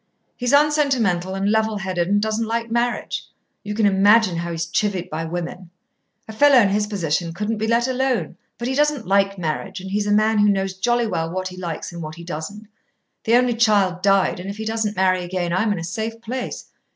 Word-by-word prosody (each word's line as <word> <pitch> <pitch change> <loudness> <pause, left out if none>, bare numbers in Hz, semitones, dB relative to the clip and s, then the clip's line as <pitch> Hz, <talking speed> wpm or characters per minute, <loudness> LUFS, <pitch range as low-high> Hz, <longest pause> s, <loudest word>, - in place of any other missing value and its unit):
He's 245 0 -1
unsentimental 270 - +2
and 195 +1 0
level 220 -1 +1
headed, 185 -3 -2
and 205 +2 +2
doesn't 220 +1 -1
like 230 0 -2
marriage. 240 +1 -1 0.4
You 210 0 -5
can 220 -1 +2
imagine 200 -1 +4
how 170 +1 -3
he's 165 0 -3
chivied 185 0 -1
by 160 +1 -3
women. 175 +2 -5 0.6
A 220 - -8
fellow 285 +4 +5
in 215 -5 +5
his 210 +1 0
position 170 -4 -2
couldn't 210 +3 -2
be 220 - -1
let 235 +2 +2
alone. 255 - -1 0.2
But 240 - -4
he 260 - -1
doesn't 295 -3 +1
like 195 +1 +2
marriage, 180 +3 -3
and 190 +1 -8
he's 205 +1 0
a - - +1
man 215 +1 +3
who 205 0 +5
knows 195 -1 0
jolly 240 +5 +1
well 165 -6 -2
what 185 +2 -3
he 185 - -10
likes 175 -3 -5
and 170 - -7
what 155 0 -7
he 170 - -10
doesn't. 180 +6 -7 0.6
The 230 - +4
only 250 0 +3
child 200 -6 +2
died, 195 -2 +2
and 185 +2 -6
if 200 - -6
he 220 - -5
doesn't 220 -1 -1
marry 185 -1 +2
again, 175 -1 -2
I'm 210 +4 +1
in 205 - -1
a 165 - -5
safe 220 +7 -4
place. 245 +2 -5
205 Hz, 215 wpm, -21 LUFS, 180-225 Hz, 0.6 s, fellow